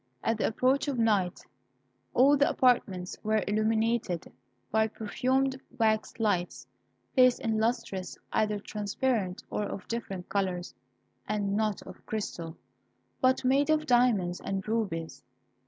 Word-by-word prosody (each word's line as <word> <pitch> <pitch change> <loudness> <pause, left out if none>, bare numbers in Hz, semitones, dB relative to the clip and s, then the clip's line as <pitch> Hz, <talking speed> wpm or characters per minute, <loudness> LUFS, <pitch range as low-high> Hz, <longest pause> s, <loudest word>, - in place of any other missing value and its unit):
At 225 -1 0
the - - +2
approach 260 +6 +1
of 275 -3 -1
night, 205 -6 +1 0.7
all 275 +4 +6
the 285 0 +3
apartments 195 -8 +1
were 215 -1 +1
illuminated 220 -3 0 0.4
by 220 +1 +3
perfumed 260 +5 -1 0.2
wax 220 -2 +1
lights, 195 -6 0 0.5
placed 255 -2 +5
in 220 -1 0
lustres 225 -5 -2 0.2
either 210 -1 +1
transparent 210 -1 -2
or - - -1
of 195 -2 -6
different 195 -6 -4
colours, 185 -3 -2 0.5
and 205 -1 -1
not 215 -2 0
of - - -12
crystal, 170 -6 -4 0.6
but 255 0 +3
made 275 +3 +3
of 310 0 +2
diamonds 235 -9 +2
and 195 0 -3
rubies. 165 - -2
220 Hz, 125 wpm, -29 LUFS, 195-245 Hz, 0.7 s, all